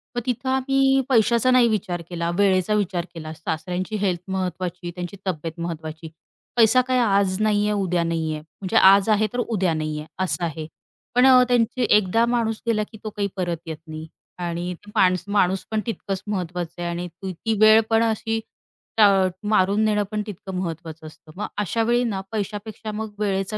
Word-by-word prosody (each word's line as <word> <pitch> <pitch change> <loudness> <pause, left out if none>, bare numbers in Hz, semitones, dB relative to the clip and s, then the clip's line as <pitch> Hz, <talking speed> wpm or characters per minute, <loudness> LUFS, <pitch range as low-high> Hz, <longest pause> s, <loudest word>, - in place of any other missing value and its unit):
मग 240 - -1
तिथं 255 +1 -2
आम्ही 270 0 +3
पैशाचा 235 0 +3
नाही 250 -2 +5
विचार 180 -5 -2
केला, 170 -1 -2
वेळेचा 195 0 +3
विचार 185 -4 -1
केला. 155 -2 -7
सासऱ्यांची 180 +5 -4
हेल्थ 185 -4 -1
महत्त्वाची, 180 -2 -3
त्यांची 180 +2 -6
तब्येत 165 -1 -4
महत्त्वाची. 160 -1 -6 0.5
पैसा 240 +2 +5
काय 255 -1 +2
आज 200 -4 +2
नाही 210 -1 +2
आहे, - - +1
उद्या 180 -2 0
नाही 165 -1 -1
आहे 155 - -5
म्हणजे 185 +6 -7
आज 195 +1 +6
आहे 215 0 +3
तर 245 - -2
उद्या 195 -8 0
नाही 155 -1 -3
आहे 150 - -8 0.2
असं 180 -1 -1
आहे. 160 -1 -5 0.5
पण 250 +1 +6
अ, 255 -1 +7
त्यांची 245 0 +1
एकदा 210 +3 +2
माणूस 225 -2 -1
गेला 215 -2 +2
की 220 - -11
तो 215 - -3
काही 205 -1 -2
परत 175 -2 -1
येत 160 -1 -5
नाही 155 0 -7 0.3
आणि 175 +1 -3
ते 205 +4 -15
माणस 180 -1 +3
माणूस 195 -2 +1
पण 220 -1 0
तितकंच 200 -5 -4
महत्त्वाचं 180 -3 -4
आहे 175 - -2
आणि 175 +1 -4
त 175 +3 -10
ती 220 +6 -2
वेळ 215 +1 +8
पण 225 0 +3
अशी 225 0 -1 0.6
ट - - +4 0.5
मारून 205 0 +3
नेणं 210 -1 +2
पण 215 0 -1
तितकं 195 -1 -7
महत्त्वाचं 165 -3 -5
असतं. 155 0 -15
मग 210 - -4
अशावेळी 230 +4 +1
ना, 205 -5 -2
पैशापेक्षा 215 0 -5
मग 215 0 -5
वेळेचा 195 0 -1
195 Hz, 185 wpm, -23 LUFS, 175-220 Hz, 0.6 s, वेळ